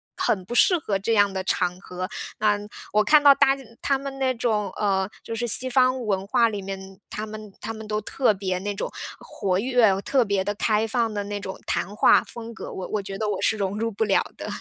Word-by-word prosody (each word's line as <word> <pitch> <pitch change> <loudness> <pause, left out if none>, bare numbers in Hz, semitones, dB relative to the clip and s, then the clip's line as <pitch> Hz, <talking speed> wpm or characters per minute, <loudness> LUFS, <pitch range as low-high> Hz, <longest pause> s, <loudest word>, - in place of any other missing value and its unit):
很 190 -4 0
不 235 - -6
适 360 +9 +5
合 210 - -1
这 215 +4 0
样 205 -2 +4
的 190 -1 -2
场 180 -1 0
合。 185 -1 -5 0.3
那， 210 -1 +2 0.3
我 210 0 +4
看 300 +4 +6
到 285 -1 +9
大 270 -1 +4
家 275 - -11 0.2
他 275 - +2
们 275 0 -6
那 260 -1 +2
种， 215 -4 0
呃， 195 -2 +1
就 230 - -5
是 240 +1 -2
西 255 +3 0
方 255 -1 +2
文 195 -2 0
化 230 +2 +3
里 205 -2 -4
面， 190 0 -8
他 215 - -4
们 215 -1 -9
他 225 +2 -4
们 220 -1 -9
都 210 0 -1
特 235 +2 +1
别 190 -2 -2
那 205 +2 -3
种 - - -3 0.3
活 190 -3 -2
跃， 225 -4 +3
特 260 +4 +2
别 200 -2 0
地 205 - -1
开 215 +1 +1
放 230 0 0
的 205 -1 -2
那 205 0 -4
种 190 -1 -7
谈 195 +4 -2
话 - - +5
风 230 0 -9
格， - - -8
我 185 - -5
我 210 - -2
觉 195 0 -6
得 215 - -2
我 200 - -2
是 220 - +2
融 200 0 -2
入 230 +1 -1
不 205 +1 -1
了 205 -3 +3
的。 - - -6
210 Hz, 255 characters per minute, -24 LUFS, 195-235 Hz, 0.3 s, 到